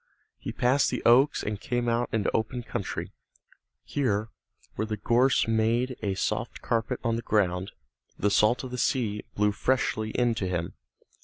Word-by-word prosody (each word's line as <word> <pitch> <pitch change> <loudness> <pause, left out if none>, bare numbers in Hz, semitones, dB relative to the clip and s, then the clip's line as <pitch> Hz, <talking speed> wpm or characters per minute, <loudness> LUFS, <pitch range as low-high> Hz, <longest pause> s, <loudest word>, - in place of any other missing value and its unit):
He - - -5
passed 130 +3 +2
the - - -3
oaks 130 +5 +5
and 105 -1 -3
came 120 0 -1
out 120 +1 +1
into 110 -3 0
open 120 +3 -1
country. - - -4 0.7
Here, 110 -6 -1 0.4
where 110 - -2
the 110 -1 -3
gorse 120 +5 +3
made 115 +3 +1
a 100 -3 -1
soft - - -2
carpet 115 +2 -1
on 115 -2 +1
the - - -3
ground, 95 -3 0 0.5
the 100 +3 +1
salt 110 +6 +3
of 130 - -6
the 125 - -4
sea 110 -6 0
blew 105 0 +3
freshly 110 -1 0
in 120 +1 +1
to 105 -4 -2
him. 85 -2 -2
115 Hz, 165 wpm, -27 LUFS, 105-125 Hz, 0.7 s, oaks